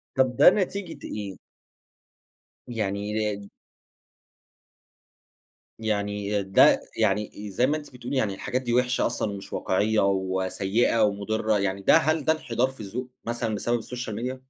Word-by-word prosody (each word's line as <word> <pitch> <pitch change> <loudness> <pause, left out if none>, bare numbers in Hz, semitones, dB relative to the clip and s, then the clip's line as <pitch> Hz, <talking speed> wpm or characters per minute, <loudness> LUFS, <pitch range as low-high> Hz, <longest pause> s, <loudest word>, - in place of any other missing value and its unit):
طَب 130 -1 +2
ده - - +9
نتيجية 195 -2 -2
إيه؟ 100 -3 -5 1.3
يعني 100 -4 -2 0.4
د 100 - -12 2.3
يعني 105 -1 -1
ده، 95 0 +5 0.2
يعني 105 -1 0
زي 125 +7 +2
ما 155 +2 +1
أنتِ 145 -3 -11
بتقولي 125 +2 -4
يعني، 105 -6 +1
الحاجات 130 +6 -2
دي 120 -2 -2
وِحشة 125 +1 +2
أصلًا 115 -3 -1
ومش 100 -1 -8
واقعيّة 105 +3 +1
وسيّئة 95 +4 +1
ومضِرّة، 105 +1 +1
يعني 100 0 -1
ده - - +6
هل 155 0 +1
ده 160 - +5
إنحدار 125 -5 0
في 130 - -12
الذّوق 115 +5 -5 0.2
مثلًا 115 -2 -2
بسبب 120 +3 -1
الSocial 125 -2 -6
Media؟ 130 +1 -3
110 Hz, 135 wpm, -26 LUFS, 100-125 Hz, 2.3 s, ده